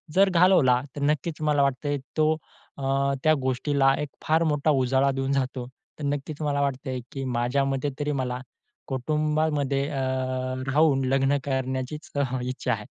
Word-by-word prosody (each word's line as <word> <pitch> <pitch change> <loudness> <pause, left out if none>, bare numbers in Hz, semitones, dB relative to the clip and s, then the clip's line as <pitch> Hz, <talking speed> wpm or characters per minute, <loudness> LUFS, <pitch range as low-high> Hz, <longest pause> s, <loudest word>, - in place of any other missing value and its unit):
जर 195 +1 +6
घालवला. 170 -9 +5
तर 145 - -5
नक्कीच 150 +2 0
मला 150 -2 +3
वाटतं 140 +1 -1
आहे 145 - +1 0.2
तो 155 0 +4 0.5
अ, 135 0 +1
त्या 155 - +5
गोष्टीला 135 +1 +2
एक 150 - -3 0.2
फार 160 +2 +3
मोठा 150 -1 +1
उजाळा 130 +2 +2
देऊन 135 0 -2
जातो. 130 -2 -2 0.3
तर - - -6
नक्कीच 145 +2 -3
मला 145 -2 0
वाटतं 140 -1 -2
आहे, 130 -1 -2
की 135 - -5
माझ्यामते 135 +3 0
तरी 145 0 -1
मला 125 0 -3 0.5
कुटुंबामध्ये 150 0 0
अ, 145 - -4 0.8
राहून 145 -3 +4
लग्न 135 +2 +2
करण्याचीच 130 +2 -3
अ, 140 - +2
हं, 130 -2 -1
इच्छा 130 -1 -1
आहे. 105 -1 -5
140 Hz, 160 wpm, -26 LUFS, 130-150 Hz, 0.8 s, जर